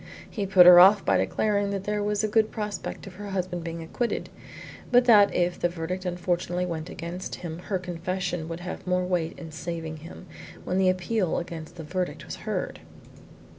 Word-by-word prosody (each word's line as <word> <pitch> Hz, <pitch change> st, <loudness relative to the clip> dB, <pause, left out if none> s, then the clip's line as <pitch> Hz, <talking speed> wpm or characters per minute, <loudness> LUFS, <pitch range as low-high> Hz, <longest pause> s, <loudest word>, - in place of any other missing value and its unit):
He 205 Hz, -3 st, -4 dB
put 185 Hz, -2 st, +7 dB
her 175 Hz, 0 st, +10 dB
off 195 Hz, +2 st, +7 dB
by -, -, +3 dB
declaring 205 Hz, -2 st, 0 dB
that 200 Hz, -1 st, -3 dB
there 210 Hz, 0 st, -1 dB
was 210 Hz, 0 st, 0 dB
a -, -, +2 dB
good 220 Hz, +1 st, +2 dB
prospect 210 Hz, -2 st, -5 dB
of 195 Hz, -, -10 dB
her 205 Hz, 0 st, -7 dB
husband 185 Hz, -3 st, -3 dB
being 165 Hz, 0 st, -5 dB
acquitted, 235 Hz, +9 st, -3 dB, 0.6 s
but 245 Hz, 0 st, +5 dB
that 210 Hz, -4 st, +7 dB
if 175 Hz, 0 st, 0 dB
the 175 Hz, -, +1 dB
verdict 180 Hz, +2 st, -4 dB
unfortunately 175 Hz, 0 st, -1 dB
went 165 Hz, -1 st, -5 dB
against 170 Hz, +3 st, -6 dB
him 170 Hz, -2 st, -7 dB
her 195 Hz, -, +1 dB
confession 180 Hz, -1 st, -3 dB
would 165 Hz, +1 st, -6 dB
have 180 Hz, +1 st, -7 dB
more 180 Hz, 0 st, +1 dB
weight 175 Hz, -3 st, -1 dB
in 165 Hz, -2 st, -9 dB
saving 160 Hz, -1 st, -5 dB
him, 165 Hz, +3 st, -11 dB, 0.4 s
when 185 Hz, -, -1 dB
the 190 Hz, -1 st, +4 dB
appeal 185 Hz, +1 st, 0 dB
against 170 Hz, -1 st, -6 dB
the 165 Hz, -, -8 dB
verdict 180 Hz, +3 st, -3 dB
was -, -, -7 dB
heard. -, -, -3 dB
180 Hz, 190 wpm, -26 LUFS, 170-200 Hz, 0.6 s, her